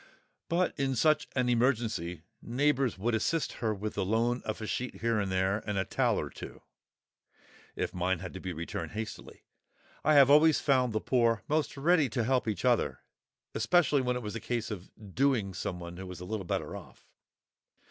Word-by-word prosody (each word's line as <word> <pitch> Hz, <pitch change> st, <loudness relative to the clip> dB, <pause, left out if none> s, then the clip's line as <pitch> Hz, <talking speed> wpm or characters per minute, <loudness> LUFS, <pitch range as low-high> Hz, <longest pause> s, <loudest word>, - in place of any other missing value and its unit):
But 175 Hz, +2 st, +1 dB
in 135 Hz, -1 st, 0 dB
such 150 Hz, +5 st, +3 dB
an 125 Hz, -2 st, +1 dB
emergency 115 Hz, -, 0 dB, 0.2 s
neighbours 135 Hz, -1 st, +1 dB
would 115 Hz, +5 st, -1 dB
assist 155 Hz, +8 st, 0 dB
her 110 Hz, -2 st, +1 dB
with 105 Hz, +1 st, -4 dB
the -, -, -1 dB
loan 115 Hz, +5 st, +1 dB
of 110 Hz, +1 st, -3 dB
a 110 Hz, -, -5 dB
sheet 125 Hz, +3 st, -4 dB
here 115 Hz, -1 st, +1 dB
and 100 Hz, -2 st, -1 dB
there 95 Hz, +2 st, +1 dB
and 105 Hz, -, -1 dB
a 95 Hz, -, +1 dB
towel -, -, +1 dB
or -, -, -4 dB
two, -, -, -10 dB, 1.1 s
if -, -, -2 dB
mine 90 Hz, +1 st, 0 dB
had 90 Hz, +1 st, -7 dB
to 95 Hz, -, -6 dB
be 95 Hz, -, -5 dB
returned 85 Hz, 0 st, -5 dB
hastily. 110 Hz, 0 st, -7 dB, 0.6 s
I 155 Hz, 0 st, +4 dB
have 140 Hz, -1 st, +7 dB
always 155 Hz, +1 st, +6 dB
found 130 Hz, -4 st, +2 dB
the 110 Hz, -, 0 dB
poor 115 Hz, -3 st, +2 dB
most 150 Hz, -1 st, 0 dB
ready 155 Hz, -1 st, +3 dB
to 115 Hz, +2 st, -1 dB
help 125 Hz, +1 st, +1 dB
each 105 Hz, -5 st, -2 dB
other—especially 145 Hz, +5 st, 0 dB
when 125 Hz, -1 st, 0 dB
it 125 Hz, -, -4 dB
was 105 Hz, -, -5 dB
a -, -, -3 dB
case 120 Hz, -1 st, -3 dB
of 95 Hz, -3 st, -7 dB, 0.2 s
"doing" 125 Hz, -8 st, +1 dB
someone 85 Hz, -1 st, -5 dB
who 95 Hz, 0 st, -7 dB
was 90 Hz, 0 st, -8 dB
a 90 Hz, -, -7 dB
little 95 Hz, -1 st, -4 dB
better -, -, -2 dB
off. -, -, -12 dB
115 Hz, 190 wpm, -30 LUFS, 95-135 Hz, 1.1 s, have